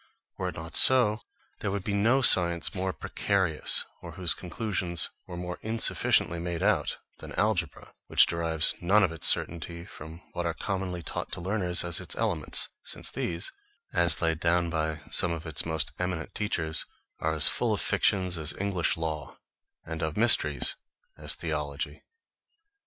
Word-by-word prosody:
Were -, -, -3 dB
it -, -, -9 dB
not 80 Hz, +1 st, -7 dB
so, 115 Hz, -4 st, +6 dB, 0.4 s
there 105 Hz, -, -2 dB
would 100 Hz, -1 st, -3 dB
be 100 Hz, -, -2 dB
no 115 Hz, +7 st, +2 dB
science 85 Hz, -6 st, +3 dB
more 95 Hz, 0 st, -2 dB
precarious, 95 Hz, -5 st, 0 dB, 0.2 s
or -, -, -9 dB
whose 90 Hz, -2 st, +2 dB
conclusions 90 Hz, -3 st, -2 dB, 0.2 s
were 90 Hz, -, -7 dB
more 90 Hz, 0 st, -6 dB
insufficiently 110 Hz, -6 st, +1 dB
made 85 Hz, -1 st, -3 dB
out, -, -, +1 dB, 0.2 s
than -, -, -9 dB
algebra; 95 Hz, -7 st, -1 dB
which -, -, +6 dB
derives 80 Hz, -1 st, +2 dB
none 100 Hz, +4 st, +4 dB
of 90 Hz, -, +1 dB
its 80 Hz, -, +2 dB
certainty 85 Hz, +1 st, 0 dB
from 80 Hz, -2 st, -11 dB
what 90 Hz, -, -3 dB
are 85 Hz, -, -2 dB
commonly 95 Hz, -3 st, -4 dB
taught -, -, -5 dB
to 90 Hz, -, -4 dB
learners 90 Hz, -1 st, 0 dB
as 85 Hz, -1 st, 0 dB
its -, -, -5 dB
elements, -, -, 0 dB, 0.2 s
since -, -, -1 dB
these, 85 Hz, 0 st, -3 dB, 0.4 s
as 85 Hz, 0 st, +2 dB
laid 80 Hz, -1 st, +1 dB
down 85 Hz, 0 st, +1 dB
by 80 Hz, -1 st, -2 dB
some 90 Hz, -, +3 dB
of 80 Hz, -1 st, -5 dB
its 80 Hz, -3 st, +3 dB
most 80 Hz, -1 st, -1 dB
eminent 90 Hz, -2 st, -3 dB
teachers, 85 Hz, -7 st, -1 dB, 0.4 s
are 80 Hz, 0 st, -1 dB
as 75 Hz, -, +5 dB
full -, -, +1 dB
of -, -, 0 dB
fictions 90 Hz, -4 st, +2 dB
as 80 Hz, 0 st, +2 dB
English 95 Hz, -5 st, 0 dB
law, 80 Hz, -2 st, -5 dB, 0.5 s
and 80 Hz, 0 st, -6 dB
of 80 Hz, +1 st, -3 dB
mysteries 120 Hz, +3 st, +4 dB, 0.4 s
as -, -, +1 dB
theology. -, -, -4 dB
85 Hz, 165 wpm, -28 LUFS, 80-95 Hz, 0.5 s, so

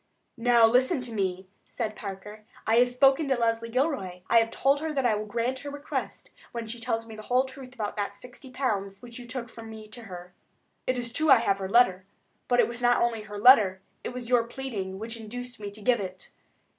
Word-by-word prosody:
"Now, 235 Hz, -1 st, +6 dB
listen 250 Hz, +4 st, +3 dB
to 245 Hz, -2 st, -5 dB
me." 190 Hz, -2 st, -2 dB, 0.2 s
said 220 Hz, -3 st, -4 dB
Parker. 210 Hz, +1 st, -8 dB, 0.2 s
"I 225 Hz, +1 st, +3 dB
have 245 Hz, +1 st, +5 dB
spoken 270 Hz, +4 st, +4 dB
to 270 Hz, -, +2 dB
Leslie 230 Hz, -1 st, 0 dB
Gilroy; 240 Hz, -, -1 dB
I 230 Hz, -, +8 dB
have 225 Hz, 0 st, +1 dB
told 275 Hz, +4 st, +2 dB
her 315 Hz, +1 st, -3 dB
that 270 Hz, -4 st, -1 dB
I 235 Hz, -, +4 dB
will 210 Hz, 0 st, -3 dB
grant 240 Hz, +4 st, -1 dB
her 285 Hz, -, -7 dB
request 285 Hz, +1 st, -5 dB, 0.2 s
when 235 Hz, -1 st, -4 dB
she 230 Hz, +2 st, -6 dB
tells 225 Hz, -1 st, -2 dB
me 225 Hz, -1 st, -10 dB
the 215 Hz, -, -8 dB
whole 250 Hz, +4 st, +2 dB
truth 260 Hz, -1 st, -11 dB
about 210 Hz, -4 st, -3 dB
that 200 Hz, -1 st, -2 dB
sixty 250 Hz, +5 st, -13 dB
pounds 205 Hz, -7 st, -2 dB
which 240 Hz, 0 st, -9 dB
you 245 Hz, -, -10 dB
took 245 Hz, 0 st, -5 dB
from 225 Hz, -1 st, -11 dB
me 220 Hz, -1 st, -10 dB
to 240 Hz, +2 st, -10 dB
her. 180 Hz, -2 st, -10 dB, 0.5 s
It 255 Hz, -, +1 dB
is 240 Hz, -1 st, -4 dB
true 315 Hz, +3 st, +1 dB
I 265 Hz, -, +9 dB
have 200 Hz, -4 st, +1 dB
her 190 Hz, -1 st, -4 dB
letter; 190 Hz, -5 st, +4 dB, 0.4 s
but 245 Hz, 0 st, +2 dB
it -, -, +5 dB
was 235 Hz, +1 st, -7 dB
not 245 Hz, 0 st, +4 dB
only 235 Hz, -2 st, +1 dB
her 210 Hz, -1 st, -8 dB
letter, 205 Hz, -5 st, +6 dB, 0.2 s
it -, -, -3 dB
was 245 Hz, -1 st, -6 dB
your 245 Hz, -1 st, +4 dB
pleading 225 Hz, -7 st, -5 dB
which 225 Hz, +3 st, -5 dB
induced 245 Hz, +2 st, -8 dB
me 205 Hz, -1 st, -5 dB
to 205 Hz, +1 st, -11 dB
give 245 Hz, 0 st, +3 dB
it. 185 Hz, -1 st, -7 dB
230 Hz, 230 wpm, -27 LUFS, 210-250 Hz, 0.5 s, I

